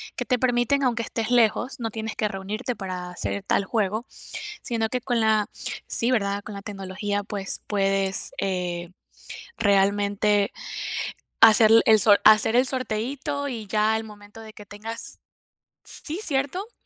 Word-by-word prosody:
que -, -, -2 dB
te 250 Hz, -, +1 dB
permiten, 250 Hz, +2 st, +1 dB
aunque 235 Hz, -3 st, +1 dB
estés 225 Hz, 0 st, -3 dB
lejos, 245 Hz, +3 st, +2 dB
no 225 Hz, -1 st, -2 dB
tienes 220 Hz, 0 st, -5 dB
que 215 Hz, -, 0 dB
reunirte 210 Hz, +5 st, -4 dB
para 185 Hz, -3 st, -5 dB
hacer 100 Hz, -, -4 dB
tal 200 Hz, -, +1 dB
juego, 215 Hz, +2 st, -1 dB, 0.6 s
sino 225 Hz, -3 st, -1 dB
que 250 Hz, -, -1 dB
con 245 Hz, -2 st, -1 dB
la 215 Hz, -1 st, +3 dB, 0.4 s
Sí, 235 Hz, -, +4 dB
¿verdad? 200 Hz, -4 st, 0 dB
Con 210 Hz, -, -8 dB
la 200 Hz, -, -7 dB
tecnología, 205 Hz, 0 st, -4 dB
pues 200 Hz, -2 st, -3 dB
puedes, 195 Hz, -1 st, +1 dB
eh, 180 Hz, -2 st, -2 dB, 0.7 s
realmente 200 Hz, 0 st, +2 dB, 0.9 s
hacer 220 Hz, 0 st, +8 dB, 0.2 s
el 220 Hz, -1 st, +7 dB
sor 205 Hz, 0 st, +5 dB
hacer 215 Hz, +2 st, +6 dB
el 255 Hz, -, +4 dB
sorteíto 260 Hz, +3 st, -3 dB
y 225 Hz, -5 st, -6 dB
ya 215 Hz, +1 st, +2 dB
al 220 Hz, 0 st, -2 dB
momento 210 Hz, 0 st, -13 dB
de 220 Hz, -, -11 dB
que 210 Hz, -1 st, -13 dB
tengas 220 Hz, +3 st, -7 dB, 0.7 s
Sí, 325 Hz, +6 st, -5 dB
¿cierto? 295 Hz, -, -2 dB
215 Hz, 150 wpm, -24 LUFS, 200-240 Hz, 0.9 s, hacer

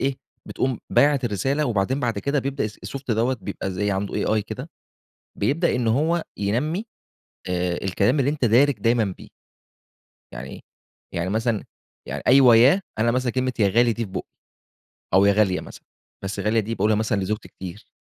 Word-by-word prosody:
إيه، 135 Hz, 0 st, 0 dB, 0.3 s
بتقوم 130 Hz, -3 st, -1 dB
بعَتّ 140 Hz, -3 st, +3 dB
الرسالة، 135 Hz, +8 st, 0 dB
وبعدين 120 Hz, +5 st, 0 dB
بعد 115 Hz, -5 st, -1 dB
كده 140 Hz, +6 st, 0 dB
بيبدأ 135 Hz, -4 st, -2 dB
الSoft 135 Hz, +5 st, -8 dB
دوّة 120 Hz, +4 st, +1 dB
بيبقى 100 Hz, -1 st, -4 dB
زي 100 Hz, +2 st, -1 dB
عنده 100 Hz, 0 st, -2 dB
AI 110 Hz, -, +2 dB
كده، 125 Hz, +8 st, -7 dB, 0.7 s
بيبدأ 145 Hz, -, +1 dB
إن 125 Hz, -2 st, 0 dB
هو 160 Hz, +8 st, +1 dB
ينمِّي 140 Hz, -, -1 dB, 0.6 s
آآ، 90 Hz, -1 st, -1 dB
الكلام 100 Hz, +8 st, +1 dB
اللي 140 Hz, +2 st, +2 dB
أنتَ 150 Hz, -3 st, -2 dB
دارِج 125 Hz, +5 st, +4 dB
دايمًا 115 Hz, -4 st, +1 dB
بيه. -, -, -12 dB, 1.0 s
يعني 65 Hz, +2 st, -8 dB, 0.5 s
يعني 85 Hz, +2 st, -1 dB
مثلًا، 110 Hz, 0 st, 0 dB, 0.4 s
يعني -, -, -4 dB
أيوه، 125 Hz, -3 st, +7 dB
يا 140 Hz, -, +5 dB, 0.2 s
أنا 115 Hz, +2 st, +3 dB
مثلًا 125 Hz, 0 st, 0 dB
كلمة 130 Hz, 0 st, 0 dB
"يا 100 Hz, -3 st, +4 dB
غالي" 120 Hz, +3 st, +3 dB
دي 115 Hz, +1 st, -3 dB
في 95 Hz, -, -10 dB
بُقِّي، -, -, -5 dB, 0.9 s
أو 95 Hz, +1 st, +6 dB
"يا 100 Hz, -, +5 dB
غالية" 100 Hz, -3 st, +2 dB
مثلًا، -, -, -12 dB, 0.4 s
بس 95 Hz, 0 st, -4 dB
غالية 110 Hz, +1 st, +2 dB
دي 110 Hz, +2 st, -4 dB
باقولها 105 Hz, +1 st, +2 dB
مثلًا 110 Hz, -1 st, 0 dB
لزوجتي 105 Hz, +3 st, -3 dB
كتير. 95 Hz, +3 st, -10 dB
115 Hz, 170 wpm, -23 LUFS, 100-130 Hz, 1.0 s, أيوه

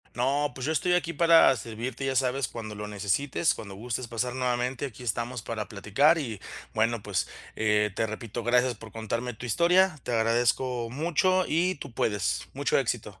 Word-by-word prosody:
No, 140 Hz, +4 st, +1 dB
pues, 130 Hz, -, -6 dB
yo 160 Hz, -, +1 dB
estoy 180 Hz, +3 st, +1 dB
aquí 170 Hz, -2 st, +1 dB
para 165 Hz, 0 st, +6 dB
a 135 Hz, -, +2 dB
servirte, 120 Hz, +3 st, -5 dB
ya 135 Hz, -, 0 dB
sabes, 130 Hz, 0 st, +1 dB
cuando 110 Hz, -2 st, -7 dB
lo 105 Hz, 0 st, -5 dB
necesites, 105 Hz, -, 0 dB
cuando 100 Hz, -2 st, -8 dB
gustes 120 Hz, +4 st, -4 dB
pasar 120 Hz, +2 st, -2 dB
nuevamente, 125 Hz, +1 st, -1 dB
aquí 125 Hz, -1 st, -10 dB
estamos 120 Hz, +1 st, -2 dB
para 110 Hz, -2 st, -4 dB
platicar 115 Hz, -, +3 dB
y 115 Hz, -9 st, -4 dB, 0.3 s
bueno, 115 Hz, 0 st, +1 dB
pues, 100 Hz, -4 st, -1 dB, 0.3 s
eh, 105 Hz, -1 st, +2 dB
te 110 Hz, -, +1 dB
repito, 110 Hz, +1 st, -6 dB
gracias 125 Hz, +1 st, +3 dB
por 110 Hz, 0 st, -12 dB
contarme 115 Hz, +2 st, -3 dB
tu 115 Hz, -, -10 dB
historia, 170 Hz, -, +3 dB
te 125 Hz, -, -3 dB
agradezco 120 Hz, +1 st, +1 dB
mucho 170 Hz, +7 st, +2 dB
y 180 Hz, +4 st, +2 dB
tú 140 Hz, -1 st, -8 dB
puedes, 105 Hz, -4 st, -1 dB
mucho -, -, +1 dB
éxito. -, -, -3 dB
120 Hz, 180 wpm, -27 LUFS, 110-140 Hz, 0.3 s, para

